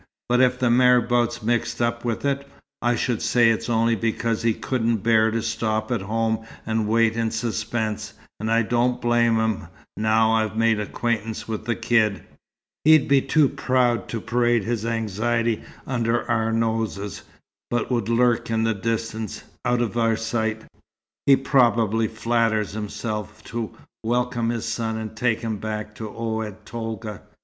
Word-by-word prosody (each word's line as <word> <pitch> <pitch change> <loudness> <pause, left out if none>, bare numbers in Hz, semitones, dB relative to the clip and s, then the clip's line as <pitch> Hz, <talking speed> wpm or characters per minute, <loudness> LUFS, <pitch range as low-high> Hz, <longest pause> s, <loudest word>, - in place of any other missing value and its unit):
But 125 +1 +4
if 125 0 +3
the 125 -2 +2
marabout's 120 -1 +3
mixed 120 +1 0
up 120 0 0
with 120 +2 -2
it, 140 0 -1 0.3
I 120 0 +2
should 120 0 -1
say 120 -2 +4
it's 115 - -2
only 115 0 +2
because 115 +1 -1
he 115 -1 +2
couldn't 115 -5 -1
bear 110 -1 +4
to 115 0 -2
stop 110 0 -1
at 120 -5 0
home 110 +2 -1 0.2
and 110 -1 0
wait 115 0 +3
in 115 -1 0
suspense, 110 -1 -2 0.3
and 110 +2 -2
I 115 +1 +4
don't 120 +2 +1
blame 120 -1 +3
him, 110 -2 -1 0.3
now 110 +1 +3
I've 110 -1 0
made 115 -1 +3
acquaintance 110 +1 -2
with 110 -1 -4
the 115 0 0
kid. 110 -5 +1 0.6
He'd 155 -2 +6
be 140 -1 +4
too 145 +2 +3
proud 125 -6 +1
to 115 - -3
parade 120 -1 +1
his 115 0 -2
anxiety 115 +1 0 0.2
under 120 -2 0
our 115 -2 +1
noses, 110 -4 -1 0.5
but 120 +1 -1
would 115 -3 0
lurk 120 0 +2
in 110 0 +1
the 115 0 +2
distance, 110 0 -3 0.2
out 120 0 +2
of 115 - -4
our 115 -1 +3
sight, 110 -1 -2 0.6
he 140 - +8
probably 115 -5 +2
flatters 115 -2 0
himself, 105 0 -5
to 115 -1 -4 0.3
welcome 120 0 0
his 115 -1 -2
son, 110 -1 -2
and 110 -1 -6
take 110 0 0
him 110 -2 -2
back 105 0 -5
to 110 - -7
Oued 110 -2 -4
Tolga. 110 -3 -5
115 Hz, 160 wpm, -23 LUFS, 110-120 Hz, 0.6 s, he